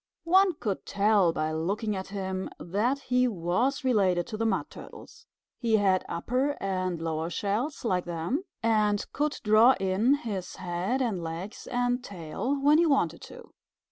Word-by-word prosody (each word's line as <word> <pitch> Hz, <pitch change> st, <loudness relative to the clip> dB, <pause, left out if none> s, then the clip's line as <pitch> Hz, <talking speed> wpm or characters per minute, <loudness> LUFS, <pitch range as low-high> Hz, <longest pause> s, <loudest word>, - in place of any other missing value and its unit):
One 375 Hz, +1 st, +4 dB
could 205 Hz, -9 st, -3 dB
tell 200 Hz, -3 st, +3 dB
by 155 Hz, -1 st, -2 dB
looking 200 Hz, +7 st, -2 dB
at 190 Hz, 0 st, -5 dB
him 190 Hz, -1 st, -4 dB
that 210 Hz, +10 st, 0 dB
he 250 Hz, -1 st, +2 dB
was 230 Hz, -, 0 dB
related 190 Hz, -9 st, +2 dB
to 215 Hz, -, -6 dB
the 225 Hz, +1 st, 0 dB
Mud 195 Hz, -4 st, -1 dB
Turtles. 455 Hz, 0 st, -12 dB, 0.3 s
He 225 Hz, -3 st, +2 dB
had 190 Hz, -3 st, +2 dB
upper 255 Hz, +11 st, -1 dB
and 185 Hz, -3 st, -2 dB
lower 160 Hz, 0 st, -2 dB
shells 215 Hz, -, -2 dB
like 185 Hz, -5 st, 0 dB
them, 175 Hz, -, -2 dB, 0.2 s
and 210 Hz, -2 st, +2 dB
could 295 Hz, +1 st, -1 dB
draw 220 Hz, +4 st, +6 dB
in 195 Hz, +8 st, +2 dB
his 205 Hz, -9 st, -5 dB
head 185 Hz, +8 st, -2 dB
and 210 Hz, -8 st, -2 dB
legs 165 Hz, +5 st, -6 dB
and 245 Hz, 0 st, 0 dB
tail 200 Hz, -, -3 dB
when 295 Hz, +3 st, +5 dB
he 340 Hz, -, +4 dB
wanted 175 Hz, -, +1 dB
to. -, -, -13 dB
205 Hz, 160 wpm, -28 LUFS, 180-250 Hz, 0.3 s, draw